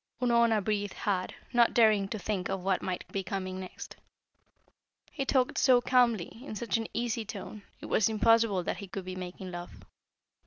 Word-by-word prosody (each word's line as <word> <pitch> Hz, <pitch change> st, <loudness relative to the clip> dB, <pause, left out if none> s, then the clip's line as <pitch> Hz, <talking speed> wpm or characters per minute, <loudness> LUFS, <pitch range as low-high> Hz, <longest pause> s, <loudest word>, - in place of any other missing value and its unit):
Unorna 235 Hz, -3 st, +3 dB
breathed 205 Hz, -1 st, -1 dB
hard, 190 Hz, -3 st, -2 dB, 0.2 s
not 240 Hz, -1 st, +4 dB
daring 215 Hz, -4 st, +5 dB
to 215 Hz, -, -4 dB
think 190 Hz, -2 st, -3 dB
of 195 Hz, -1 st, -3 dB
what 190 Hz, -1 st, +1 dB
might 180 Hz, -1 st, -4 dB
be 195 Hz, -, -1 dB
coming 185 Hz, 0 st, -4 dB
next. 185 Hz, -1 st, -9 dB, 1.1 s
He 275 Hz, -3 st, -3 dB
talked 260 Hz, +1 st, +1 dB
so 255 Hz, -2 st, +6 dB
calmly, 240 Hz, -5 st, +2 dB
in 245 Hz, -, -7 dB
such 235 Hz, +3 st, -2 dB
an 225 Hz, -, -3 dB
easy 235 Hz, -1 st, -1 dB
tone, 210 Hz, 0 st, -8 dB, 0.2 s
it -, -, -7 dB
was 220 Hz, -, +2 dB
impossible 225 Hz, -3 st, +3 dB
that -, -, -2 dB
he 200 Hz, -, -8 dB
could 190 Hz, 0 st, -6 dB
be 185 Hz, 0 st, -5 dB
making 185 Hz, 0 st, -7 dB
love. 175 Hz, 0 st, -6 dB
210 Hz, 180 wpm, -30 LUFS, 190-235 Hz, 1.1 s, so